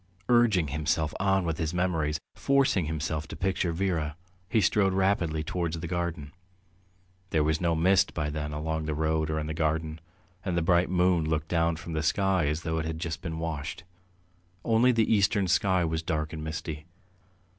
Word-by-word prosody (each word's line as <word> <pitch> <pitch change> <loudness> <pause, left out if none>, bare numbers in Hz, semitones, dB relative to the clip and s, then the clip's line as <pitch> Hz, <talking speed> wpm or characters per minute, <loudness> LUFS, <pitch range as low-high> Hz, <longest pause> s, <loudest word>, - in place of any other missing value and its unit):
Urging 110 -10 +4
himself 75 +1 0
on 95 -1 +2
with 80 -2 -2
his 80 +1 -2
memories, 80 -4 0
forcing 135 -10 +2
himself 80 0 -3
to - - -7
picture 95 -2 0
Vera, 80 -4 -1 0.3
he 110 - +3
strode 95 0 +3
rapidly 90 -5 +1
towards 85 0 -2
the 85 - -5
garden. 85 -4 -3 1.0
There 80 -3 +2
was 80 +2 0
no 85 -2 +2
mist 90 +4 +3
by 75 -2 -1
then 75 0 -4
along 80 +1 -3
the 75 -1 -2
road 80 0 0
or 80 - -1
in 75 - -2
the 80 - -3
garden, 80 0 -1 0.4
and 90 -3 -1
the 85 - +1
bright 85 +1 +3
moon 90 -3 +2
looked 80 0 -1
down 85 -1 +2
from 80 +1 -7
the 80 - 0
sky 95 0 +2
as 75 +3 -2
though 80 -1 -1
it 80 - -3
had 80 0 -3
just 80 0 -4
been 80 -1 -4
washed; 80 0 -4 0.8
only 115 +2 +4
the 115 -2 +3
eastern 100 -1 +2
sky 90 0 +2
was 80 0 -1
dark 80 -1 -2
and 80 -1 -5
misty. 80 0 -5
80 Hz, 185 wpm, -28 LUFS, 80-90 Hz, 1.0 s, Urging